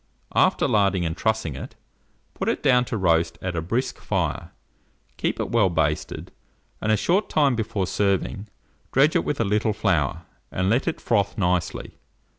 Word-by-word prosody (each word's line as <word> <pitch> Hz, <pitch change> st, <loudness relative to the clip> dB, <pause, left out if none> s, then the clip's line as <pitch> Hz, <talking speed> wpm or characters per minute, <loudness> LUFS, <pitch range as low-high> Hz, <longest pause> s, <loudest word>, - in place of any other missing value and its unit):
After -, -, +3 dB
larding 100 Hz, -4 st, +2 dB
and 80 Hz, 0 st, -2 dB
trussing 110 Hz, -, -1 dB
it, -, -, -8 dB, 0.6 s
put -, -, -2 dB
it -, -, -2 dB
down 125 Hz, -3 st, +4 dB
to 115 Hz, -, -3 dB
roast 85 Hz, -3 st, +2 dB
at 95 Hz, -2 st, -4 dB
a 80 Hz, -, -1 dB
brisk 115 Hz, +10 st, -2 dB
fire; -, -, -2 dB, 0.7 s
keep -, -, -2 dB
it -, -, -2 dB
well 105 Hz, -5 st, +4 dB
basted, 80 Hz, -3 st, -1 dB, 0.5 s
and 110 Hz, -, +1 dB
a 110 Hz, -, +4 dB
short 180 Hz, -, +1 dB
time 140 Hz, -4 st, +3 dB
before 110 Hz, -3 st, -1 dB
serving, 100 Hz, +2 st, -1 dB, 0.4 s
dredge 140 Hz, +4 st, +4 dB
it -, -, +3 dB
with 145 Hz, -, -2 dB
a 115 Hz, -, +2 dB
little 105 Hz, +2 st, +1 dB
flour, 90 Hz, -10 st, 0 dB, 0.3 s
and 95 Hz, +2 st, 0 dB
let 125 Hz, +8 st, +1 dB
it 165 Hz, -, -1 dB
froth 100 Hz, -3 st, 0 dB
nicely. 90 Hz, -3 st, -1 dB
100 Hz, 170 wpm, -24 LUFS, 90-115 Hz, 0.7 s, down